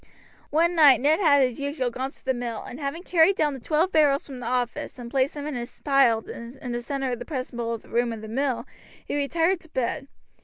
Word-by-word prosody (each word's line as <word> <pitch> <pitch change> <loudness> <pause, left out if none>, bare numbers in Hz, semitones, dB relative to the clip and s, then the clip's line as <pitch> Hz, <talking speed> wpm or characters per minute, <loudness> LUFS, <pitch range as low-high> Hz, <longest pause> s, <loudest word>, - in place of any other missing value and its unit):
One 335 +3 +2
night 290 -8 +7
Ned 300 +4 +3
had 285 -7 +5
as 250 -1 -1
usual 280 -3 -2
gone 260 +3 -3
to - - -20
the 260 - +2
mill, 240 -2 -4
and 250 - -9
having 290 +4 -4
carried 360 +1 +4
down 295 -4 +1
the 265 - -7
twelve 315 +8 +1
barrels 290 -3 +3
from 265 -3 -8
the 240 - -5
office 245 0 -2
and 235 -1 -8
placed 270 +1 +1
them 290 -1 -5
in 300 -2 -4
a 240 -1 -4 0.2
pile 270 -6 +3
in 245 +2 -8
the 240 0 -2
center 270 +1 -2
of 245 - -3
the - - -5
principal 240 -5 -3
room 235 +2 -1
of 225 -1 -6
the 220 - -8
mill 260 +3 -1 0.4
he - - -3
retired 330 +5 +1
to 325 - -19
bed. 270 +1 -2
270 Hz, 230 wpm, -25 LUFS, 245-300 Hz, 0.4 s, night